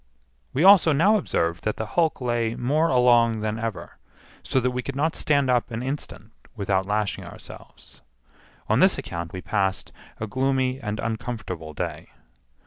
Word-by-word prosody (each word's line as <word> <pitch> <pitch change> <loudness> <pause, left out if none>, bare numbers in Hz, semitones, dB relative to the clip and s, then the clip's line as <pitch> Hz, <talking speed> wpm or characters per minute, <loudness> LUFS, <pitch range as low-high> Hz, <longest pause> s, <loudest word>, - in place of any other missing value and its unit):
We 145 - 0
also 190 -5 +7
now 195 +9 +4
observed 85 - -1
that 110 - -2
the 110 - -3
hulk 165 -5 +1
lay 120 -2 -1
more 150 +7 +1
along 120 -3 +4
than 110 +1 -2
ever, 115 -4 -5 0.4
so 130 - 0
that 125 0 0
we 125 0 -2
could 140 +1 -6
not 155 +3 0
stand 140 -3 +1
an 120 -2 0
instant 130 -5 -6 0.2
without 95 -2 0
lashing 105 0 -1
ourselves. - - -13 0.7
On - - +2
this - - +5
account 85 0 -5
we 95 -2 -7
passed 95 -4 -1 0.3
a 110 - -2
gloomy 130 +2 0
and 105 -2 -4
uncomfortable 110 -9 -5
day. - - -5
120 Hz, 155 wpm, -24 LUFS, 105-135 Hz, 0.7 s, also